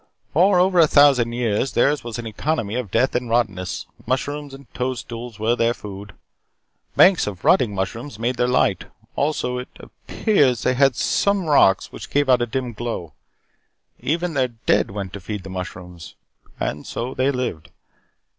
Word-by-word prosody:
"For 185 +3 +4
over 185 0 +3
a 160 - +7
thousand 140 -6 +5
years, 120 +1 -1
theirs 140 +5 +2
was 120 -1 -5
an 120 - -6
economy 110 0 -2
of 125 -4 -3
death 115 +7 +1
and 125 -1 -2
rottenness. 100 -7 -1 0.2
Mushrooms 145 +3 -2
and 135 +1 -12
toadstools 120 -2 -5
were 110 +2 +1
their 120 0 +1
food. 100 -2 -9 0.8
Banks 185 - +5
of 95 -3 -6
rotting 115 -6 +3
mushrooms 105 +7 -4
made 120 +3 -1
their 125 - +2
light. 125 - +1 0.3
Also, 135 -4 -1
it 125 - -8
appears 135 - 0
they 130 - +2
had 135 -1 +3
some 200 +6 +1
rocks 140 -11 +3
which - - -9
gave 145 -1 +1
out 125 -1 +5
a 120 - 0
dim 125 +1 -3
glow. 105 -9 -5 0.9
Even 170 +3 -1
their 130 -3 +1
dead 115 -2 0
went 100 -2 -6
to 100 - -6
feed 100 +1 -6
the 95 - -9
mushrooms. 90 -2 -8 0.4
And 75 +2 -3
so 125 +3 -4
they 130 +2 +1
lived. 125 - -3
120 Hz, 165 wpm, -22 LUFS, 105-140 Hz, 0.9 s, a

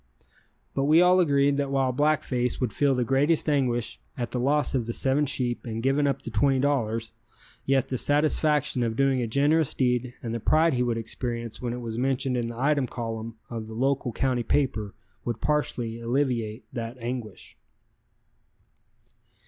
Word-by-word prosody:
But 135 - 0
we 155 +3 +5
all 180 +1 +5
agreed 140 -4 +3
that 140 -1 -1
while 135 -1 +1
Black 150 +4 +2
Face 125 -1 -1
would 125 -5 -1
feel 140 -2 +2
the 125 - +1
greatest 140 +7 +2
anguish 125 -6 0 0.2
at 120 -2 -3
the 125 - -2
loss 145 +4 +1
of 125 -4 0
the 115 - -2
seven 140 +4 +1
sheep 125 -3 -1
and 115 -1 -5
giving 140 +2 +2
up 140 - -1
the 120 - -6
$20, 125 -2 +1 0.6
yet 135 -1 +2
the 130 - -1
satisfaction 150 -2 +2
of 115 -2 0
doing 135 0 +2
a 120 - -1
generous 145 +5 +2
deed 125 -1 0
and 115 -1 -3
the 115 - -2
pride 155 +7 +3
he 125 - 0
would 120 -2 0
experience 115 0 -4
when 120 -2 -2
it 125 - -5
was 115 -1 -4
mentioned 130 0 0
in 120 -1 -1
the 115 0 -7
item 140 -1 +2
column 115 -1 -5
of 115 -2 -6
the 110 - -8
local 135 +1 0
county 130 +1 0
paper 115 -6 -1 0.3
would 120 -2 -3
partially 120 -6 -1
alleviate 120 -2 -1
that 115 +1 -5
anguish. 120 -4 -6
125 Hz, 175 wpm, -26 LUFS, 115-140 Hz, 0.6 s, we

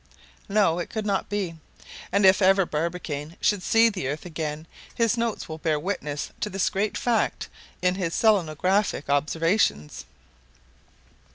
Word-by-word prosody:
No, 195 -5 +3
it 175 - -4
could 220 -2 -4
not 200 -2 -1
be. 190 -5 -3 0.5
And 200 +1 +3
if 190 +2 +6
ever 195 0 +5
Barbicane 160 -1 -4
should 205 -3 +1
see 225 +4 +4
the 200 -11 -2
earth 150 +5 -4
again, 155 -2 -4 0.3
his 230 -1 +2
notes 230 -2 -2
will 160 0 -7
bear 155 -2 0
witness 150 -5 -4
to 210 - -2
this 195 -1 0
great 205 +2 -1
fact 235 -2 0 0.3
in 180 0 +3
his 180 -3 -2
selenographic 190 -5 +1
observations. 155 - 0
180 Hz, 145 wpm, -25 LUFS, 155-205 Hz, 0.5 s, if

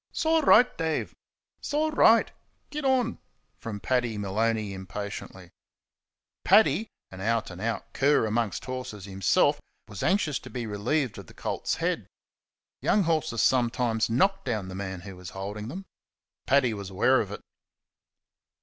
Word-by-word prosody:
"'S - - -1
all 320 0 +4
right, 250 -4 +6
Dave; 160 -1 -1 0.5
's 290 - -4
all 310 +1 +2
right 230 -6 +5 0.4
git 300 0 -4
on!" 255 -3 +1 0.4
From 110 -4 -6
Paddy 120 -2 0
Maloney, 105 +1 -1
impatiently. 95 -1 -7 0.9
Paddy, 220 0 +4 0.2
an 95 0 -9
out 115 0 0
and 90 +1 -9
out 115 +1 -3
cur 140 -3 +3
amongst 110 -3 -1
horses 125 -6 -6
himself, 95 -1 +2 0.3
was 105 -3 -8
anxious 175 -6 +1
to - - -11
be 125 -2 -4
relieved 115 +4 -1
of 95 - -11
the - - -16
colt's - - -2
head. - - -2 0.7
Young 205 - +3
horses 155 -8 0
sometimes 120 -3 +2
knock 195 - +2
down 110 -7 -2
the - - -7
man 95 -1 -5
who 95 -1 -10
is 90 -1 -8
holding 105 +2 -5
them. 185 +10 -7 0.6
Paddy 130 -4 +3
was 100 -2 -6
aware 120 +7 +3
of 100 - -5
it. 105 - -7
115 Hz, 150 wpm, -27 LUFS, 100-155 Hz, 0.9 s, right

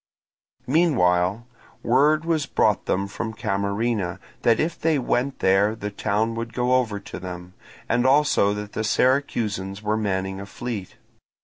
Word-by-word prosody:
Meanwhile 115 - +2 0.4
word 150 +6 +3
was 160 -4 0
brought - - +1
them 100 +1 0
from 110 +2 -5
Camarina 100 -1 -1 0.2
that 115 -2 +3
if 160 +2 -1
they 160 -2 +2
went 130 +1 -1
there 100 +3 +3
the 105 -2 -5
town 105 +2 0
would 115 0 -5
go 125 0 +1
over 115 -5 +1
to 100 - -9
them, 90 0 -8 0.3
and 120 +2 +2
also 140 -7 +4
that 105 0 -6
the 110 - -2
Syracusans 110 -5 0
were 105 +1 0
manning 95 -2 -2
a 100 - -8
fleet. 110 -3 -6
110 Hz, 145 wpm, -24 LUFS, 100-125 Hz, 0.4 s, also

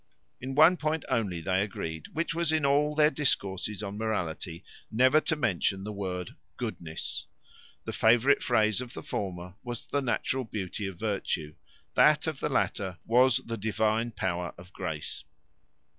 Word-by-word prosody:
In 130 +2 -5
one 160 +5 +7
point 155 +1 -1
only 105 -10 0
they 95 +3 +1
agreed, 80 -6 -4
which 165 +1 -1
was, 170 -1 +1
in 155 -2 +2
all 145 +2 +3
their 150 0 +5
discourses 105 - 0
on 100 +1 -5
morality 90 -6 -3 0.3
never 130 +7 +5
to 160 - +1
mention 95 - 0
the 105 - -4
word 90 -3 -4 0.3
goodness. 80 -2 -4 0.6
The - - -4
favourite 120 +5 +4
phrase 110 -2 +2
of 125 -2 -8
the - - -6
former, 90 -2 -4
was 120 -2 -5
the 145 - -1
natural 130 +1 0
beauty 105 -2 -4
of 95 -3 -7
virtue; 95 -7 -2 0.4
that - - +5
of - - -3
the - - -1
latter, 95 -3 0
was 125 +2 +4
the 115 0 -4
divine 110 +2 +1
power 90 -5 -2
of 90 +1 -14
grace. - - -4
110 Hz, 160 wpm, -29 LUFS, 95-130 Hz, 0.6 s, one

